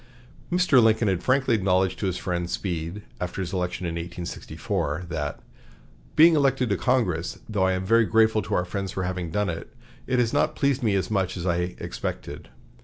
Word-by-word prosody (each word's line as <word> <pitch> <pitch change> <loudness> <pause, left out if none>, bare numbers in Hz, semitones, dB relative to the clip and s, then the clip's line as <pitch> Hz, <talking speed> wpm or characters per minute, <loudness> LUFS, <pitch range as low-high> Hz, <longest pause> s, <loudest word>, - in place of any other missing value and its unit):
Mr. 175 -8 +5
Lincoln 110 0 +3
had 95 -3 +1
frankly 130 -1 +2
acknowledged 95 -3 +2
to 100 - -1
his 90 - -1
friend 85 -1 -2
Speed, 85 +2 -3 0.2
after 90 +2 -4
his 95 -1 -3
election 90 -1 -2
in 85 - -2
1846, 85 -1 -4
that 75 -2 -3 0.8
"being 165 +1 +7
elected 135 -5 +2
to - - +3
Congress, 95 -8 0
though 100 -3 +1
I 95 - +2
am 95 0 -2
very 115 +3 +4
grateful 110 0 +3
to 90 - -2
our 90 - +1
friends 95 +1 -4
for 95 - -2
having 90 -1 -3
done 105 +4 0
it, 80 -2 -5 0.4
has 125 -3 +2
not - - +2
pleased 140 -2 +1
me 110 -4 +2
as 95 +1 -1
much 95 -3 0
as 85 - -4
I 90 0 0
expected." - - -5
95 Hz, 185 wpm, -25 LUFS, 90-115 Hz, 0.8 s, being